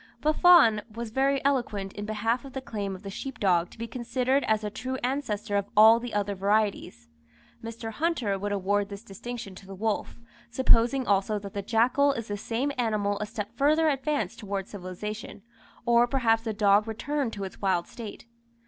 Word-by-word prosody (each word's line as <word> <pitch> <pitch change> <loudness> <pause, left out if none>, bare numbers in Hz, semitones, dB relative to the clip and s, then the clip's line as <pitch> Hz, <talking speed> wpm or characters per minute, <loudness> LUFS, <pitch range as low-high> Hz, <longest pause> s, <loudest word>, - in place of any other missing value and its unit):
Buffon 305 - +6
was 230 0 -6
very 270 +2 +1
eloquent 220 -8 0
in 205 - -6
behalf 225 +4 -1
of 270 -2 -11
the 265 - -3
claim 205 -6 -4
of 185 - -12
the 195 - -6
sheep 270 +6 -6
dog 175 -3 +2
to - - -16
be 230 - -4
considered 255 +3 0
as 220 -1 +1
the 210 -1 -4
true 260 +5 -4
ancestor 230 -6 -2
of 200 0 -1
all 220 +2 +8
the 240 0 -6
other 205 -1 -1
varieties. 200 - -1 0.6
Mr. 225 0 -6
Hunter 245 - -1
would 205 +1 -3
award 200 +1 0
this 200 +1 -8
distinction 235 0 -7
to 190 +1 -13
the 195 - -8
wolf; 215 +3 -2 0.3
supposing 250 +1 +3
also 200 +1 +1
that 200 -1 -8
the 200 - -3
jackal 245 +7 +3
is 230 -4 -5
the 205 - -2
same 230 +7 -2
animal 210 -3 0
a 210 - -3
step 210 +1 -6
further 310 +4 +3
advanced 290 +1 -1
towards 200 -2 -4
civilization, 205 +2 -7 0.4
or 235 0 +4
perhaps 235 -4 +2
the 225 -1 -3
dog 205 0 +3
returned 265 +3 -2
to 200 - -5
its 190 - -8
wild 185 -3 +1
state. 230 -3 -9
220 Hz, 185 wpm, -27 LUFS, 200-250 Hz, 0.6 s, all